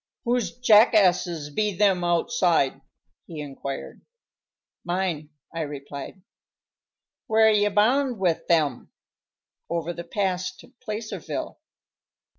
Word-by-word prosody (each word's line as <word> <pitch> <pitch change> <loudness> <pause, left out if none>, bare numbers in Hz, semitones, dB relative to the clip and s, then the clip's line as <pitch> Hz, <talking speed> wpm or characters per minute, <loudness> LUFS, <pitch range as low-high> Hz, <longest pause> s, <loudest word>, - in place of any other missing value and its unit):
"Whose 245 0 -1
jackasses 190 -9 +4
be 210 +3 -1
them 195 -3 +3
outside?" 170 -5 +1 0.5
he 165 -3 -8
inquired. 140 -1 -7 0.8
"Mine," 175 -4 -2 0.2
I 165 - -3
replied. 145 +4 -7 1.0
"Where 220 0 +5
ye 205 -1 +3
bound 245 +5 +2
with 175 -4 0
them?" 150 -7 +1 0.8
"Over 170 0 -2
the 170 - -7
pass 185 0 -2
to 255 - -17
Placerville." 215 -2 -5
180 Hz, 95 wpm, -25 LUFS, 160-210 Hz, 1.0 s, Where